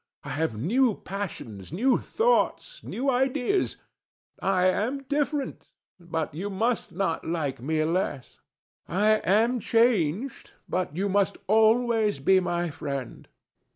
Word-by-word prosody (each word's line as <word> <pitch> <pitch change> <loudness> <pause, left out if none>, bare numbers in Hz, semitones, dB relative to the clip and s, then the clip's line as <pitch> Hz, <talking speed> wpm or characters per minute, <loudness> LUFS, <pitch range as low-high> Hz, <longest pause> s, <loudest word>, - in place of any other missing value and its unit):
I - - -7
have 145 -7 -1
new 225 - +2
passions, 150 - -6
new 245 +10 +2
thoughts, - - 0
new 265 +3 -4
ideas. 265 +8 +1 0.6
I 185 -2 +2
am 230 +9 0
different, 285 0 -2 0.3
but 165 -3 -3
you 185 +7 -4
must 225 +4 -1
not 175 -2 -1
like 145 -6 -2
me 155 +4 0
less. 160 -5 -2 0.5
I 210 +4 +3
am 225 +7 +3
changed, 225 - +1
but 180 -5 -2
you 195 +3 0
must 200 0 +1
always 220 - +3
be 185 +8 +4
my 175 -2 -1
friend. 140 -5 -6
195 Hz, 120 wpm, -26 LUFS, 165-245 Hz, 0.6 s, be